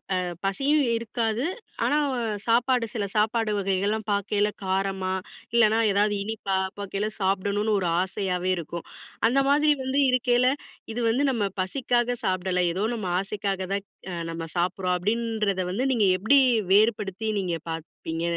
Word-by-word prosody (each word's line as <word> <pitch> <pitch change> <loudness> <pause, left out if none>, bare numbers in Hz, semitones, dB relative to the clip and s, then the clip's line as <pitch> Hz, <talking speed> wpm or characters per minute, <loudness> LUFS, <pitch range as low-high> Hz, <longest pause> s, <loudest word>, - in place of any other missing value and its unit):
அ - - +1 0.3
பசியும் 280 +10 +2
இருக்காது. 230 +1 -1 0.4
ஆனா, 295 - +2 0.5
சாப்பாடு 240 +1 +3
சில 205 -3 -1
சாப்பாடு 220 +1 +2
வகைகள்லாம் 200 +3 -1
பாக்கையில, 205 +1 +1 0.2
காரமா, 190 0 -1 0.4
இல்லன்னா 225 -1 +4
ஏதாவது 205 +1 +2
இனிப்பா 205 -2 -2 0.2
பாக்கையில 200 +1 -2
சாப்பிடணுன்னு, 200 +3 +1
ஒரு 180 - -1
ஆசையாவே 185 -1 -2
இருக்கும். 170 0 -6 0.4
அந்த 265 +4 +3
மாதிரி 300 +2 +4
வந்து 265 +2 +1
இருக்கையில, 250 0 +3 0.4
இது 235 - -3
வந்து 255 +6 +2
நம்ம 225 -5 0 0.2
பசிக்காக 240 +3 0
சாப்பிடல. 185 -1 0
ஏதோ 190 +4 -1
நம்ம 215 -5 -4
ஆசைக்காக 195 -1 -3
தான் 200 0 -2 0.3
அ - - -3 0.2
நம்ம 165 0 -5
சாப்பிட்றோம் 180 +1 0
அப்டின்றத 210 -1 0
வந்து, 245 +8 -1
நீங்க 215 -5 +3
எப்டி 270 +9 +5 0.3
வேறுபடுத்தி, 210 0 +2
நீங்க 175 -3 -2
பாப்பீங்க, 165 0 -5
205 Hz, 135 wpm, -26 LUFS, 190-230 Hz, 0.5 s, எப்டி